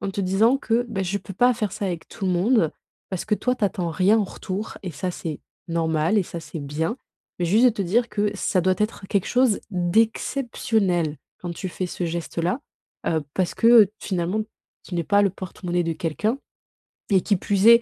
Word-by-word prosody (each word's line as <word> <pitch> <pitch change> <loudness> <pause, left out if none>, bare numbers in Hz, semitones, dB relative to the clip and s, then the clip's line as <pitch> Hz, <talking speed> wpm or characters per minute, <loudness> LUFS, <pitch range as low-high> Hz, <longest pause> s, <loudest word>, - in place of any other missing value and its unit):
en 195 - -2
te 200 - -2
disant 200 +7 +3
que: 240 -2 0
«Bah, 200 -4 -2
je 190 +2 -1
peux 195 - -10
pas 245 +5 +5
faire 215 -4 -2
ça 200 - -3
avec 175 -3 -4
tout 195 - -6
le 185 - +2
monde», 180 - +3 0.4
parce 185 - -3
que 215 - +2
toi, 250 +4 0
tu 220 - 0
attends 180 -4 -1
rien 190 +6 +4
en - - +3
retour 195 +3 -5
et 180 - -3
ça, 180 +6 -3
c'est 160 -3 -5 0.3
normal 165 +3 +1
et - - +3
ça, 170 -1 -7
c'est 160 +1 -7
bien 155 - -2 0.4
mais 175 - +2
juste 215 +8 +4
de 250 - +7
te 210 -3 -3
dire 230 +7 +2
que 210 -1 0
ça 185 - +1
doit 185 +1 +2
être 210 -2 -2
quelque 195 -2 +1
chose 250 -4 +3
d'exceptionnel 195 - +1 0.2
quand 175 -1 -5
tu 185 +2 -5
fais 185 +1 -3
ce 175 - -4
geste-là, 170 - -2 0.5
heu, 160 -2 +1
parce 185 -2 0
que, 230 -4 +7
finalement, 185 +3 -1 0.4
tu 180 - -7
n'es 170 - +1
pas 200 +4 +3
le 200 -2 +3
porte-monnaie 180 -1 -3
de 165 -1 -1
quelqu'un 210 - -1 0.7
et 190 -2 +4
qui 200 0 +1
plus 200 +3 +2
est, 235 0 +9
190 Hz, 210 wpm, -24 LUFS, 175-215 Hz, 0.7 s, est